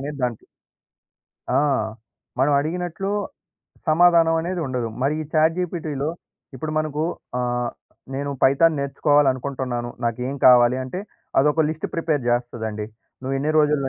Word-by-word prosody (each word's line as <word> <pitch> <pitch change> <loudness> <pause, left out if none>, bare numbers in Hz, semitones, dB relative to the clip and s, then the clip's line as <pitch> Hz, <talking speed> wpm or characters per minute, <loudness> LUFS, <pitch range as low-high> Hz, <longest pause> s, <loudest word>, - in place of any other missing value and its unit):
అనేది 145 +1 -5
దాంట్ 120 -3 -3 1.1
ఆ! - - +4 0.8
మనం 135 +3 +3
అడిగినట్లు 175 +4 -3 0.8
సమాధానం 165 0 +5
అనేది 175 +1 -3
ఉండదు. 125 -3 -2
మరి 140 +3 +2
ఈ - - -7
చాట్‌జీపీటీలో 160 -3 0 0.5
ఇప్పుడు 155 +4 -4
మనకు 155 -1 -1 0.4
ఆహ్, 120 -1 -1 0.4
నేను 140 +1 -2
పైథాన్ 155 +4 +5
నేర్చుకోవాలనుకుంటున్నాను. 135 -3 +1
నాకేం 125 +4 -2
కావాలి? 125 0 +7
అంటే 155 +9 -5 0.4
అదొక 150 +3 +3
లిస్ట్ 155 0 -4
ప్రిపేర్ 160 -5 0
జేస్తదండి. 110 -3 -2 0.4
నువ్వు 135 +1 -2
ఎన్ని 145 +3 0
రోజుల్లో 150 -2 +2
140 Hz, 115 wpm, -23 LUFS, 125-160 Hz, 1.1 s, కావాలి